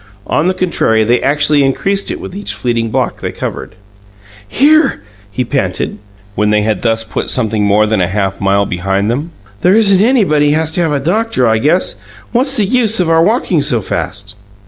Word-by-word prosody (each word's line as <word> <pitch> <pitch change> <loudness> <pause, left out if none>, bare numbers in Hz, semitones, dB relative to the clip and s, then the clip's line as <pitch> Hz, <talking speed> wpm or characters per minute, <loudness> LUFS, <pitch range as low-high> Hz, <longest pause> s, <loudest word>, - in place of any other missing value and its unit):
On 155 - 0
the 185 - 0
contrary, 140 -12 +1
they 120 +3 +1
actually 150 0 +2
increased 195 +9 0
it - - -4
with - - -8
each 205 - -4
fleeting 115 -2 -1
block - - -2
they - - -3
covered. - - -6 0.7
"Here!" 300 - +2 0.3
he 125 +5 -3
panted, - - -2 0.3
when 105 +1 0
they 105 0 +2
had 110 0 -1
thus 115 -1 0
put 110 - -4
something 110 -4 0
more 105 +1 +3
than 110 -2 0
a 90 - +1
half 95 0 -2
mile 100 +1 +2
behind 95 +4 -1
them. 145 +7 -3 0.3
"There 185 +3 +4
isn't 200 -4 +4
anybody 185 - +2
has 160 0 -1
to 175 - 0
have 165 -3 0
a 145 - 0
doctor, 175 - 0
I 110 0 +2
guess! 155 - +1 0.3
What's 265 +3 +1
the 210 - +2
use 225 -1 +2
our 165 -2 +3
walkin' 195 - +1
so 130 -5 +1
fast?" 100 0 -4
145 Hz, 190 wpm, -13 LUFS, -, 0.7 s, There